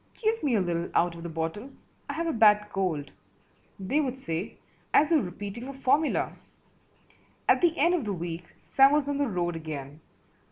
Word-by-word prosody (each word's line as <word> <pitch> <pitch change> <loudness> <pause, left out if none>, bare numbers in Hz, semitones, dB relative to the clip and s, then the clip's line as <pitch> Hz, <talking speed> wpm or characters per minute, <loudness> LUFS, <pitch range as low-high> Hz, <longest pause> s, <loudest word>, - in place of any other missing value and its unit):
"Give 450 0 0
me 270 -5 +1
a 205 - +3
little 170 -1 -2
out 175 0 +3
of 170 - -10
the 170 - -6
bottle, 165 - -4 0.4
I - - -2
have 335 - -2
a 325 - 0
bad 210 -2 +5
cold," 170 -7 -2 0.7
they 230 +11 +1
would 265 -3 -3
say, 165 -6 -4 0.4
as 305 +3 +5
though 320 - +5
repeating 205 +4 -6
a 275 - -7
formula. 280 +3 +1 1.1
At - - +4
the 340 -2 +3
end 340 +5 +4
of 325 -9 0
the 205 - -2
week 170 -1 -5 0.2
Sam 270 +1 +5
was 295 -1 +2
on 285 0 -1
the 285 - +2
road 175 -5 -1
again. 150 -3 -7
210 Hz, 190 wpm, -27 LUFS, 170-285 Hz, 1.1 s, bad